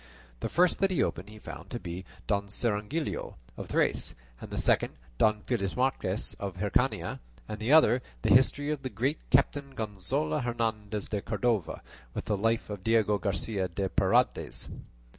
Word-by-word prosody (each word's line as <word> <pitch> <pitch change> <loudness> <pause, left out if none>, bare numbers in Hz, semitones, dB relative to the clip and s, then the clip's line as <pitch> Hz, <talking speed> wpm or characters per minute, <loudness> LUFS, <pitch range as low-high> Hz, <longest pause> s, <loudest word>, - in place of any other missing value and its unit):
The - - -2
first 180 0 +3
that 195 - +3
he 185 - +2
opened 100 - -3
he 110 - -11
found - - -9
to 120 - -4
be 90 0 -6 0.2
"Don 100 -1 0
Cirongilio 105 +8 -2 0.2
of - - -7
Thrace," - - +1 0.3
and - - -7
the - - -5
second - - +3 0.3
"Don 105 -1 +3
Felixmarte 115 -2 0
of 100 -3 -4
Hircania," 100 +2 0 0.3
and 105 - -5
the 110 +5 0
other 130 -6 +6 0.2
the 110 -3 +5
"History 145 +4 +4
of 150 -2 -2
the 130 - -3
Great 130 +8 -1
Captain 140 +1 +2
Gonzalo 95 -8 -1
Hernandez 110 -4 -2
de 105 -2 -1
Cordova, 115 -7 -1 0.3
with - - -3
the 105 - +1
Life 115 +2 0
of 100 -3 -6
Diego 110 -2 +3
Garcia 100 -1 -1
de 95 +2 -2
Paredes." - - +1
110 Hz, 160 wpm, -29 LUFS, 100-125 Hz, 0.3 s, other